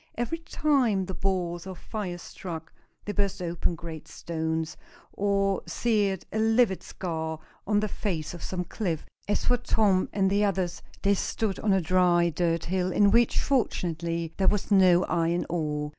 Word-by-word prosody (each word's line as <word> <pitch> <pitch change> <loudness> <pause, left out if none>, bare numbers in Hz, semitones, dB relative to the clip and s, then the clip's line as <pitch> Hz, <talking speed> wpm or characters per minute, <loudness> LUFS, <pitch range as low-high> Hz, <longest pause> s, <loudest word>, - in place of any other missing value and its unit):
Every 240 +8 -2
time 265 - +1
the 190 - -5
balls 180 -2 -2
of 185 -2 -7
fire 200 -5 -5
struck, 165 -2 -8 0.3
they 205 - -2
burst 200 -2 0
open 175 -1 -1
great 165 -1 -8
stones, 160 -1 -3 0.4
or 195 -1 +1
seared 205 -5 0
a 220 - 0
livid 220 -3 +3
scar 160 -3 -4 0.3
on 205 0 +3
the 215 - 0
face 180 -7 -3
of 175 - -9
some 180 -1 -3
cliff. 175 -4 -3 0.2
As 205 - 0
for 245 - +3
Tom 210 -6 +2
and 195 -1 +2
the 205 +1 +3
others, 185 -3 0 0.2
they 200 0 +4
stood 200 0 -1
on 215 - +1
a 190 -1 +4
dry 175 0 +3
dirt 165 +1 0
hill, 185 +1 0
in 200 +1 +4
which, 235 +2 +4
fortunately, 170 - -1
there 190 - +2
was 210 0 +1
no 185 -2 +6
iron 170 0 0
ore. 150 -3 -1
185 Hz, 165 wpm, -27 LUFS, 170-205 Hz, 0.4 s, no